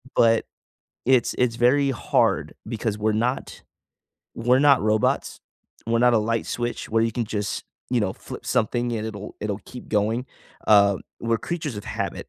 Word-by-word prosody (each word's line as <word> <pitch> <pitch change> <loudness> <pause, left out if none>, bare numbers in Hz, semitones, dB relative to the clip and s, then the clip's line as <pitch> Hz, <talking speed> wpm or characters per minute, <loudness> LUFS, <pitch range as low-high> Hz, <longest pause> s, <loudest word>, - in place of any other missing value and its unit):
but 115 -1 +4 0.6
it's 130 -1 +3
it's 125 -2 +2
very 135 +3 +3
hard 120 - +1
because 110 -2 -2
we're 110 +1 +1
not 120 +5 -2 0.7
we're 125 +2 +3
not 140 -1 +5
robots, 110 0 +1 0.5
we're 115 0 +2
not 125 +1 +5
a - - +5
light 115 +1 -1
switch 120 0 -3
where 115 +1 +2
you 115 - +1
can 120 +2 -1
just, 105 -2 -3 0.3
you 125 -2 +2
know, 95 -3 0
flip - - -10
something 120 0 0
and 110 -1 -2
it'll 105 -2 -7
it'll 105 -1 -2
keep 125 - -10
going, 110 +4 0 0.4
uh, 100 -2 +6 0.2
we're 115 0 0
creatures 155 -8 -4
of 105 - -7
habit, - - -4
115 Hz, 165 wpm, -24 LUFS, 105-125 Hz, 0.7 s, uh